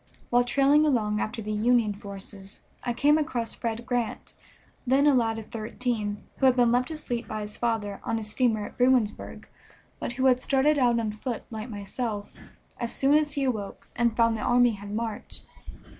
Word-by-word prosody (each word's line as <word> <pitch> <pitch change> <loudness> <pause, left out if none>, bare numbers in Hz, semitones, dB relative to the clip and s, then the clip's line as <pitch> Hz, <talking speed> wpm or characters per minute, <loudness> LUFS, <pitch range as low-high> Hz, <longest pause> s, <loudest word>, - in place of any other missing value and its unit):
While 245 0 +5
trailing 280 +4 +4
along 215 -8 +1
after 225 +1 -3
the 215 - -4
Union 220 0 +2
forces 200 -1 -10 0.2
I 245 - -1
came 290 +6 +3
across 250 -7 -2
Fred 230 0 -4
Grant, 240 -2 -3 0.5
then 270 +3 +4
a 295 - +6
lad 225 -3 +2
of 220 - -8
thirteen, 215 -2 -3
who 270 - +4
had 255 - +5
been 240 -2 +4
left 250 +3 +2
asleep 275 -7 -4
by 215 0 -4
his 210 0 -5
father 220 -4 -2
on 225 - -1
a 220 - -4
steamer 215 0 0
at - - -11
Bruinsburg, 245 -4 +1 0.5
but - - -3
who 260 +2 -1
had 255 -1 +4
started 285 +3 +2
out 240 -2 +3
on 220 -2 -1
foot 225 +2 -5
like 220 +2 -6
myself 205 0 -4 0.5
as 235 -1 -2
soon 275 +1 +2
as 300 -1 +2
he 280 - -1
awoke 220 -7 -3
and 235 -2 +1
found 230 -1 +4
the 215 - -4
army 245 +1 +4
had 205 -1 -8
marched. 220 0 -5
235 Hz, 190 wpm, -27 LUFS, 215-255 Hz, 0.5 s, a